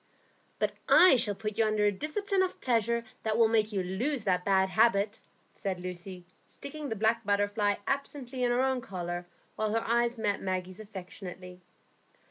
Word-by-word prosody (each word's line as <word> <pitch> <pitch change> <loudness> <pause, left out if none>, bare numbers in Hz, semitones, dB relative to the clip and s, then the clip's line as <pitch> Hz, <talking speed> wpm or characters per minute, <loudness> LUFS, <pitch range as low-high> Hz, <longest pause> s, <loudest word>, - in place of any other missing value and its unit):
"But - - +1 0.2
I 365 -6 +8
shall 220 -4 0
put 215 +1 -4
you - - +6
under 215 -1 +2
a 205 - +4
discipline 375 - -1
of 375 -1 -1
pleasure 235 -1 +1 0.2
that 220 0 0
will 230 -1 +6
make 220 -1 +2
you 195 -3 -1
lose 235 +8 -2
that 180 -3 +1
bad 190 -1 +3
habit," 210 +1 +3 0.3
said 190 -2 -3
Lucy, 180 0 -6 0.2
sticking 290 0 -8
the 225 - -2
black 225 +2 +1
butterfly 205 0 +1
absently 270 -2 -3
in 245 - +3
her 245 +2 +2
own 265 -1 +1
collar, 175 -3 -5 0.3
while 215 -1 0
her 225 - -1
eyes 235 +1 +2
met 205 -3 -1
Maggie's 185 0 -3
affectionately. 185 -3 -9
215 Hz, 170 wpm, -30 LUFS, 190-235 Hz, 0.3 s, I